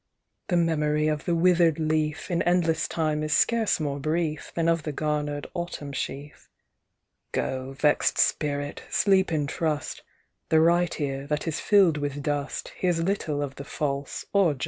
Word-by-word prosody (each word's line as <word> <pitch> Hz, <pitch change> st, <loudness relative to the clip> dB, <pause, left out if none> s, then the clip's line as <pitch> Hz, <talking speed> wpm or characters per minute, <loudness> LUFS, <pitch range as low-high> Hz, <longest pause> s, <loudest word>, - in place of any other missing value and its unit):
"The 175 Hz, -, +1 dB
memory 150 Hz, -2 st, +1 dB
of 150 Hz, 0 st, -2 dB
the 175 Hz, -, +1 dB
wither'd 170 Hz, -2 st, +4 dB
leaf 155 Hz, 0 st, -1 dB
In 170 Hz, -, +1 dB
endless 175 Hz, -2 st, +2 dB
time 155 Hz, -2 st, -1 dB
is 155 Hz, 0 st, -1 dB
scarce 230 Hz, -5 st, +2 dB
more 145 Hz, -2 st, -2 dB
brief 155 Hz, +1 st, -2 dB
Than 165 Hz, -1 st, +1 dB
of 165 Hz, -1 st, +2 dB
the 150 Hz, -, -4 dB
garner'd 150 Hz, 0 st, -2 dB
Autumn 170 Hz, -5 st, -5 dB
sheaf. 140 Hz, +2 st, -6 dB, 0.8 s
"Go, 130 Hz, +1 st, -3 dB
vexed 150 Hz, +2 st, +2 dB
Spirit, 145 Hz, -1 st, 0 dB
sleep 190 Hz, -3 st, +3 dB
in 150 Hz, -3 st, 0 dB
trust; 150 Hz, -1 st, -2 dB, 0.5 s
The 160 Hz, -, +5 dB
right 170 Hz, +1 st, +3 dB
ear, 135 Hz, -1 st, -3 dB
that 150 Hz, +2 st, -2 dB
is 160 Hz, -, -1 dB
fill'd 190 Hz, -7 st, +4 dB
with 145 Hz, -1 st, -3 dB
dust, 145 Hz, -1 st, -2 dB
Hears 175 Hz, -2 st, +1 dB
little 165 Hz, -6 st, -1 dB
of 140 Hz, -1 st, -5 dB
the 140 Hz, -, -6 dB
false 140 Hz, -1 st, -3 dB
or 190 Hz, -7 st, +4 dB
just." -, -, -16 dB
155 Hz, 165 wpm, -26 LUFS, 145-170 Hz, 0.8 s, The